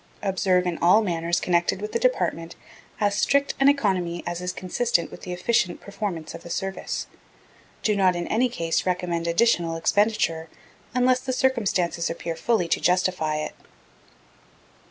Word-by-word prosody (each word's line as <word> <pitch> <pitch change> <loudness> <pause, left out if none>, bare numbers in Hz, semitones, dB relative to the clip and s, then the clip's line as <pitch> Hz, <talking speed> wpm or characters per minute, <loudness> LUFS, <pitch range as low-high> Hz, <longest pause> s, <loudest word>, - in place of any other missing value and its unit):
Observe 185 -2 +2
in 175 -2 -2
all 185 +6 +5
matters 170 -2 0
connected 175 +1 +1
with 210 +1 -5
the 230 - 0
Department 170 -9 0 0.4
as 205 -2 +2
strict 280 +7 +2
an 275 +1 +6
economy 185 -11 0
as 175 0 -4
is 180 0 -2
consistent 185 -1 -1
with - - -11
the 180 - -7
efficient 180 0 0
performance 200 -6 -5
of - - -8
the 170 - -11
Service. 195 +3 -3 0.8
Do 210 - +2
not 190 -2 +3
in 175 0 -3
any 245 +3 +2
case 165 -7 -1
recommend 175 -2 -1
additional 170 -2 +2
expenditure 165 -3 +1 0.5
unless 250 0 +3
the 260 0 -4
circumstances 200 -10 0
appear 165 0 -4
fully 185 0 +1
to - - +1
justify 180 -4 +1
it. 155 - -3
180 Hz, 155 wpm, -24 LUFS, 170-215 Hz, 0.8 s, an